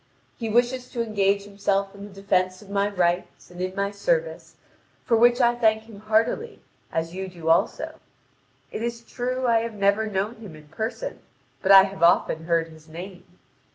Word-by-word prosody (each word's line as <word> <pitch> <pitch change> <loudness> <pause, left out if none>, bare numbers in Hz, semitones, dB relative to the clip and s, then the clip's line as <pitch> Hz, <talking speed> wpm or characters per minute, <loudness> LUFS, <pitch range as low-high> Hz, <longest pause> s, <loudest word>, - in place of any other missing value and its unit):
He 225 - -4
wishes 245 +3 +1
to 235 - -2
engage 200 -2 +1
himself 200 -1 -1
in 200 0 -11
the 195 -1 -13
defence 185 -1 +1
of 200 - -14
my 200 0 +1
rights 180 -2 -1
and 175 0 -8
in 185 +1 -3
my 200 0 -1
service, - - -2 0.5
for 235 - +3
which 240 +2 +5
I 240 -1 +4
thank 220 -2 +2
him 220 -3 -13
heartily, 220 - 0 0.3
as 165 +1 -2
you 190 +1 -4
do 170 -3 -5
also. 165 - +1 0.7
It - - -5
is 235 0 -3
true 255 +2 -3
I 230 -2 +4
have 230 -1 -4
never 200 +2 +2
known 205 +3 -2
him 210 -8 -10
in 150 -1 -16
person, 225 - -4 0.4
but 195 - +2
I 195 -1 +10
have 195 -1 -6
often 160 -1 +3
heard 165 -1 +1
his 160 0 -16
name. 180 +2 -9
200 Hz, 185 wpm, -24 LUFS, 185-230 Hz, 0.7 s, I